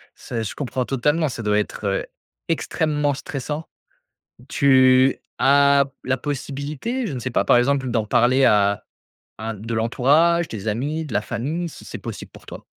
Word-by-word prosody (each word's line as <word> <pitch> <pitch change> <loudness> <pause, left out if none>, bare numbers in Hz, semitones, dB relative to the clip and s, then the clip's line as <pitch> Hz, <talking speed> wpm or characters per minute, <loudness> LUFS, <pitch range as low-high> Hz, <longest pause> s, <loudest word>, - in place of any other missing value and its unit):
c'est 115 -2 -5
je 105 - -5
comprends 130 -2 -3
totalement. 150 +5 +1
Ça 115 -3 -6
doit 105 0 +2
être, 105 - -4
heu, 95 - -1 0.4
extrêmement 150 -2 0
stressant. 145 +3 -5 0.8
Tu 130 -1 +4 0.2
as 140 0 +5 0.2
la 130 0 0
possibilité, 145 - -4
je 175 - -4
ne 130 - -4
sais 125 +1 -4
pas, - - +1
par 120 - +5
exemple, 130 0 +1
d'en 110 -3 0
parler 130 +5 +3
à 100 -3 +3 0.6
à 110 +1 -4
de 110 +3 -8
l'entourage, 150 +9 +3
des 110 -1 -7
amis, 145 +9 -2
de 130 - -8
la 105 - +1
famille, 145 +11 -3
si - - -13
c'est - - -7
possible - - -8
pour - - -16
toi? - - -10
130 Hz, 170 wpm, -22 LUFS, 115-145 Hz, 0.8 s, as